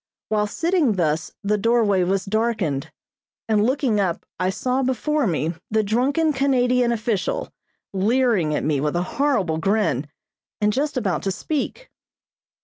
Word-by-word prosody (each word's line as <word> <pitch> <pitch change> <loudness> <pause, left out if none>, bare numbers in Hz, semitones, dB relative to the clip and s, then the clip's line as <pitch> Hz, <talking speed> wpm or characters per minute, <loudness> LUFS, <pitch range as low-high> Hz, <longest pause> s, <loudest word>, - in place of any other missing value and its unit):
While 210 -1 +1
sitting 325 - +1
thus 160 -3 0
the 210 +1 +1
doorway 220 -3 +3
was 190 +2 0
darkened, 205 -10 -1 0.6
and 215 -2 +3
looking 250 -3 +1
up 180 -4 -1
I 185 - +1
saw 255 +7 -1
before 265 +2 0
me 165 -1 -1 0.2
the 220 0 +2
drunken 275 +9 +1
Canadian 250 -3 +2
official, 225 -4 -1 0.4
leering 205 - +2
at - - -1
me 145 -3 +1
with 150 +2 -1
a 175 - +1 0.2
horrible 195 - +1
grin, 195 - +1 0.5
and 210 -1 +2
just 285 +2 -1
about 190 -10 0
to 195 - -1
speak. 310 - -4
215 Hz, 140 wpm, -22 LUFS, 185-255 Hz, 0.6 s, doorway